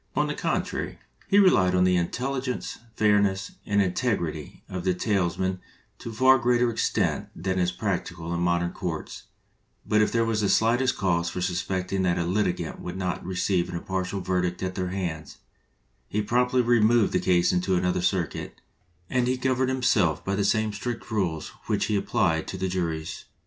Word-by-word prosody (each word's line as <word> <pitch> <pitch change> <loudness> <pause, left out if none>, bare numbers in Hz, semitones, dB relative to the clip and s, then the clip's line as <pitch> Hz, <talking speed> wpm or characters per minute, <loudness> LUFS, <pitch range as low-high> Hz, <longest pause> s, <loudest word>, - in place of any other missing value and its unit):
On - - +2
the - - -2
contrary, - - -2 0.3
he 200 - +3
relied 95 - +5
on 90 - +4
the 90 0 +3
intelligence, 130 +8 -2 0.2
fairness, 100 -3 +2 0.2
and 100 0 +2
integrity 90 - -2
of 95 -1 -5
the 95 -1 +1
tales 95 -3 0
men 95 0 -1 0.4
to - - -7
a - - -7
far 130 +3 +5
greater 120 0 +2
extent 110 - 0
than 95 +2 -2
is 90 0 +1
practical 85 -3 -3
in 85 - -1
modern 85 0 +1
courts; 85 -3 -5 0.6
but 105 0 +3
if 105 - +2
there 115 -1 +2
was 110 -1 0
the 100 - +1
slightest 120 +5 +2
cause 85 -3 +1
for - - -5
suspecting 90 +1 -1
that 90 -2 +1
a 85 - 0
litigant 90 -2 -1
would 90 +1 -6
not 90 -2 -2
receive 90 -1 0
an - - -5
impartial 95 +2 -3
verdict 90 -1 -1
at 95 0 -2
their 90 -1 -2
hands, 80 -7 -4 0.7
he 105 +1 -1
promptly 125 +3 +2
removed 120 -2 +4
the 90 - +3
case 90 -1 +3
into 90 +1 +1
another 90 0 +1
circuit, 90 -2 -2 0.5
and 125 +3 +1
he 130 +1 +1
governed 130 0 +1
himself 110 - +1
by 95 - -1
the 100 0 +1
same 110 +1 +1
strict 115 +3 -5
rules 90 -7 -1 0.2
which - - +1
he 105 - 0
applied 80 -5 +1
to 95 - -5
the 95 0 -1
juries. 85 -4 -3
95 Hz, 180 wpm, -26 LUFS, 90-110 Hz, 0.7 s, relied